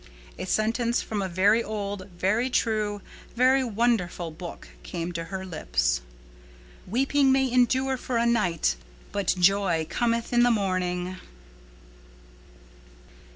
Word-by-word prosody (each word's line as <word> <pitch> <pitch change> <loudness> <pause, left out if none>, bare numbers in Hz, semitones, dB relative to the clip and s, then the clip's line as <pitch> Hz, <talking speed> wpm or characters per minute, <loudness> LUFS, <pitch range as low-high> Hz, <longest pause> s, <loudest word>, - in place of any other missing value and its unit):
A - - -4
sentence 230 +4 +1
from 210 -2 -3
a 190 - -2
very 200 +6 +3
old, 200 -2 -5
very 215 +8 +1
true, 215 -4 0 0.3
very 260 +2 +4
wonderful 215 -7 0
Book 170 +2 -9
came 170 -1 -4
to 165 -1 -4
her 190 +2 -6
lips, - - 0 0.9
"Weeping 270 +6 +2
may 265 -1 +2
endure 260 +2 +2
for 245 -1 -2
a 230 - +2
night 175 - +1 0.3
but 200 -1 0
joy 180 -3 +3
cometh 235 0 0
in 240 - +5
the 245 - +5
morning." 185 -4 -1
205 Hz, 120 wpm, -26 LUFS, 180-240 Hz, 0.9 s, in